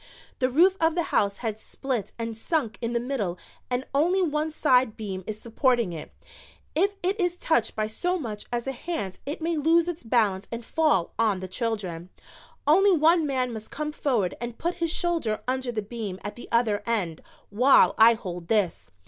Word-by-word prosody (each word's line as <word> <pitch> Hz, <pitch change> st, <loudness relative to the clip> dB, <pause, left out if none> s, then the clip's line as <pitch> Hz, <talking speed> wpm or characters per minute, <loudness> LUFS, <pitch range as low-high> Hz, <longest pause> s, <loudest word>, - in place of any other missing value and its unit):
"The 255 Hz, -, +2 dB
roof 360 Hz, +8 st, +4 dB
of 325 Hz, 0 st, +3 dB
the 345 Hz, -, +1 dB
house 200 Hz, -1 st, +2 dB
has 220 Hz, -1 st, -3 dB
split 255 Hz, -7 st, -3 dB
and 230 Hz, -1 st, -4 dB
sunk 235 Hz, 0 st, -2 dB
in 235 Hz, 0 st, -2 dB
the 235 Hz, -, +1 dB
middle 235 Hz, -8 st, -2 dB, 0.3 s
and 250 Hz, +1 st, -1 dB
only 340 Hz, +7 st, +3 dB
one 310 Hz, -3 st, 0 dB
side 255 Hz, -7 st, +2 dB
beam 195 Hz, -4 st, -5 dB
is 215 Hz, 0 st, -4 dB
supporting 235 Hz, -3 st, +1 dB
it. 160 Hz, -, -8 dB, 0.6 s
If 395 Hz, +5 st, +2 dB
it 385 Hz, +4 st, 0 dB
is 355 Hz, -1 st, +1 dB
touched 320 Hz, -10 st, +1 dB
by 215 Hz, -, 0 dB
so 355 Hz, +12 st, -1 dB
much 220 Hz, -10 st, -6 dB
as 240 Hz, -1 st, -2 dB
a 270 Hz, -, -1 dB
hand 265 Hz, -, -4 dB
it 300 Hz, +3 st, -4 dB
may 335 Hz, 0 st, 0 dB
lose 325 Hz, +3 st, +3 dB
its 350 Hz, -2 st, -4 dB
balance 220 Hz, -5 st, +1 dB
and 230 Hz, 0 st, -5 dB
fall 305 Hz, -, +1 dB
on 215 Hz, -4 st, +2 dB
the 185 Hz, -, -6 dB
children. 185 Hz, -5 st, -3 dB, 0.6 s
Only 385 Hz, +7 st, +5 dB
one 325 Hz, 0 st, +4 dB
man 255 Hz, -3 st, 0 dB
must 220 Hz, -1 st, -7 dB
come 300 Hz, +1 st, -4 dB
forward 240 Hz, -11 st, 0 dB
and 240 Hz, -1 st, -5 dB
put 345 Hz, +2 st, -1 dB
his 335 Hz, -, +1 dB
shoulder 300 Hz, -13 st, 0 dB
under 255 Hz, -1 st, -1 dB
the 215 Hz, -3 st, -3 dB
beam 210 Hz, -4 st, -5 dB
at 205 Hz, -, -5 dB
the 240 Hz, -, -10 dB
other 230 Hz, -3 st, +2 dB
end 190 Hz, -9 st, -1 dB, 0.3 s
while 250 Hz, +7 st, +5 dB
I 230 Hz, +1 st, +8 dB
hold 180 Hz, -6 st, -7 dB
this. 195 Hz, -, 0 dB
240 Hz, 190 wpm, -26 LUFS, 215-310 Hz, 0.6 s, I